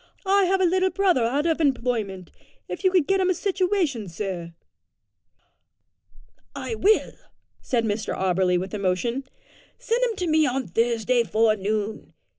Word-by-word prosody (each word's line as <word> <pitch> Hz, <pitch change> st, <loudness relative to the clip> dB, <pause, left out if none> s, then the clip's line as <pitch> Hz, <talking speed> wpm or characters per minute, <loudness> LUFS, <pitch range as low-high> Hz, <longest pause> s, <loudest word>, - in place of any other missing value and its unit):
I 395 Hz, 0 st, +4 dB
have 380 Hz, +1 st, +1 dB
a 375 Hz, -, +3 dB
little 375 Hz, +2 st, +2 dB
brother 375 Hz, -9 st, +2 dB
out 275 Hz, +6 st, 0 dB
of 330 Hz, -1 st, +1 dB
employment; 235 Hz, -, -1 dB, 0.4 s
if -, -, -6 dB
you 375 Hz, -, +5 dB
could 365 Hz, -5 st, +2 dB
get 390 Hz, +3 st, +1 dB
him 370 Hz, -1 st, +2 dB
a 370 Hz, -, +2 dB
situation, 360 Hz, -, -1 dB
sir." 170 Hz, -2 st, -5 dB, 2.0 s
"I -, -, -4 dB
will," 435 Hz, 0 st, +2 dB, 0.5 s
said 235 Hz, -3 st, 0 dB
Mr 210 Hz, 0 st, -2 dB
Auberly 185 Hz, -1 st, +1 dB
with 190 Hz, +3 st, -6 dB
emotion. 210 Hz, +7 st, -1 dB, 0.5 s
"Send 475 Hz, +2 st, -1 dB
him 470 Hz, -3 st, 0 dB
to 365 Hz, -, -3 dB
me 310 Hz, -1 st, +3 dB
on 255 Hz, -5 st, -2 dB
Thursday 235 Hz, +4 st, +1 dB
forenoon. 215 Hz, -1 st, -1 dB
250 Hz, 145 wpm, -24 LUFS, -, 2.0 s, you